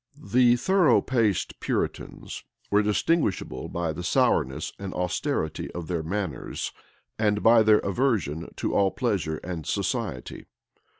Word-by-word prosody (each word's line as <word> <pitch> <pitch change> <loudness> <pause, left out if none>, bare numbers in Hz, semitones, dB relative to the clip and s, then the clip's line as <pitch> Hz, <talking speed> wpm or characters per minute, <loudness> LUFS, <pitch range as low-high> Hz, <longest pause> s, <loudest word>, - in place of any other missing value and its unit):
The 120 -2 +4
thorough 175 -1 +4
paced 110 -8 0
Puritans - - -3 0.3
were 105 +1 +5
distinguishable 105 - 0
by 85 -2 -2
the - - -6
sourness 65 +4 +1
and 100 -1 -6
austerity 85 -3 -2
of 90 -2 -5
their 85 -3 -1
manners, 90 -3 -4 0.5
and 105 -1 +1
by 115 0 +7
their 110 -1 +6
aversion 100 - -1
to - - -2
all 100 -1 +3
pleasure 95 -10 -1
and 85 -3 -5
society. 65 -3 -3
100 Hz, 125 wpm, -26 LUFS, 85-115 Hz, 0.5 s, by